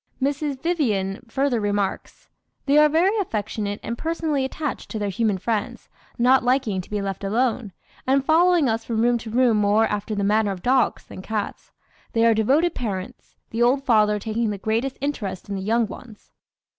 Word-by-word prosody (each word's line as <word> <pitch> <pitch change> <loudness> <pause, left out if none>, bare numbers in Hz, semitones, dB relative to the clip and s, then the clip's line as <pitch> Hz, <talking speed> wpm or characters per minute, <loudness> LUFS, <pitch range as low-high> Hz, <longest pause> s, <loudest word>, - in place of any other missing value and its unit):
Mrs. 280 0 -1
Vyvyan 220 - 0
further 270 -2 +1
remarks: 205 -2 -3 0.4
"They 285 +2 +4
are 300 0 +6
very 350 +7 +2
affectionate 210 - -3
and 235 - -3
personally 320 -4 -1
attached 285 +2 -4
to 220 - -4
their 205 -1 -2
human 215 -1 0
friends, 215 +2 -3 0.3
not 255 +2 +4
liking 245 -6 +1
to - - -16
be 210 -1 -2
left 195 0 -4
alone, 225 +1 0 0.4
and 270 +1 +2
following 335 -1 +4
us 225 -1 -1
from 225 -1 -1
room 240 0 +2
to 225 - -8
room 235 -1 +3
more 210 +2 +3
after 210 0 -3
the 200 - -1
manner 210 +1 +2
of 190 -2 -5
dogs 255 0 +1
than - - -10
cats. 210 +1 -5 0.4
"They 230 0 +3
are 230 - +5
devoted 275 +11 +2
parents, 195 -6 -6 0.2
the 230 - -2
old 260 +3 +3
father 210 -4 +3
taking 220 +2 -2
the 205 - -3
greatest 230 +6 -2
interest 205 -11 -4
in 200 - -3
the 190 - -4
young 225 +4 +1
ones. 215 +1 -12
230 Hz, 180 wpm, -23 LUFS, 205-270 Hz, 0.4 s, are